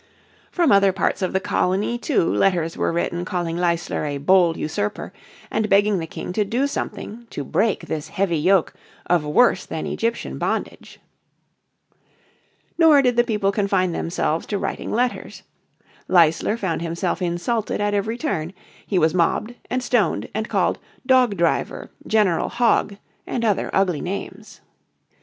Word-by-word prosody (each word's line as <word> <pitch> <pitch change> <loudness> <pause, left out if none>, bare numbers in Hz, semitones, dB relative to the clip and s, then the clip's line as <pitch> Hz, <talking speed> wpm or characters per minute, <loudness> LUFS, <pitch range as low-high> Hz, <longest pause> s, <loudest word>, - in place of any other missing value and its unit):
From 340 -6 +2
other 200 -1 +5
parts 190 - -1
of 185 - 0
the 190 - +1
colony 200 +3 0
too 220 - +1
letters 170 -4 +1
were - - 0
written 170 +1 -2
calling 175 -3 -3
Leisler 170 -2 -1
a 145 -1 -2
bold 170 +3 +3
usurper, 105 -9 -3 0.4
and 215 -1 0
begging 200 -1 +3
the 165 - -5
King 180 - -6
to 210 - +1
do 240 +7 0
something 235 -4 -5
"to 145 - -5
break 215 - 0
this 155 -2 -4
heavy 185 -5 -1
yoke 185 +2 +2 0.3
of 175 -3 +2
worse 190 +6 +3
than 160 - -5
Egyptian 230 +1 -3
bondage." - - -4 1.8
Nor 310 -4 +6
did 250 -2 +2
the 240 - +4
people 210 -4 0
confine 195 -3 +1
themselves 165 -1 -2
to 205 - -1
writing - - -4
letters. 245 +2 -2 0.6
Leisler 175 +4 +3
found 185 -7 -2
himself 170 +3 -2
insulted 180 +6 -1
at 205 0 0
every 220 +3 -1
turn. 180 - -3 0.3
He 195 - 0
was 160 -2 +3
mobbed, 195 +6 0 0.2
and 255 0 -1
stoned, 230 -8 0
and 220 +1 -3
called - - +1 0.3
"Dog 255 -6 +3
Driver," 170 -1 -1 0.2
"General 210 -6 +2
Hog" 230 -4 +1 0.3
and 235 -2 -2
other 210 -3 +1
ugly 185 -5 +1
names. 200 +3 -7
195 Hz, 150 wpm, -22 LUFS, 170-220 Hz, 1.8 s, Nor